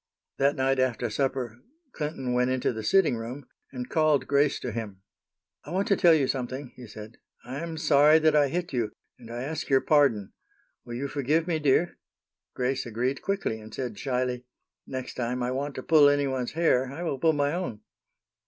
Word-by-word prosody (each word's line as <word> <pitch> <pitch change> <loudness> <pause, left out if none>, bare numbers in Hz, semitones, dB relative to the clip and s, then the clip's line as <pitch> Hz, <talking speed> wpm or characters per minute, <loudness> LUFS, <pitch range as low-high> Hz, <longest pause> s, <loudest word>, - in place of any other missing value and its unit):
That 140 +1 +3
night 135 0 +1
after 120 -3 0
supper 125 -2 -2 0.3
Clinton 150 - -3
went 125 +1 +2
into 130 -1 0
the 110 - -5
sitting 165 - +3
room, 120 +5 -7 0.3
and 125 -2 -5
called 155 -4 +2
Grace 140 0 +2
to 125 - -3
him. 105 -4 -6 0.6
"I - - -11
want 190 +3 -1
to 200 - +5
tell 170 -3 +6
you 140 -4 +2
something," 130 0 -4
he 125 -2 -11
said. 110 +1 -11 0.3
"I 130 +3 -5
am 165 0 -5
sorry 150 0 +5
that 155 -1 +3
I 145 -1 +5
hit 175 +2 -3
you, 115 -4 -1 0.3
and 115 - -13
I 120 +1 -5
ask 155 +4 -4
your 135 -1 +5
pardon. 135 -10 +2 0.5
Will 120 - -6
you 135 +3 -3
forgive 145 +4 0
me, 165 -3 -1
dear?" 150 +4 +2 0.6
Grace 130 0 -1
agreed 125 +4 -2
quickly, 195 - -2
and 110 0 -12
said, 120 -6 -5
shyly, 125 -2 -1 0.4
"Next 130 -1 -5
time 125 +1 -2
I 125 - -1
want 140 +2 -3
to 130 - -5
pull 150 -3 +6
any 145 0 +2
one's 130 -3 -2
hair, 135 -6 +2
I 160 +5 -6
will 140 -6 -2
pull 160 +3 +3
my 145 0 +1
own." 170 - -4
135 Hz, 195 wpm, -27 LUFS, 125-150 Hz, 0.6 s, tell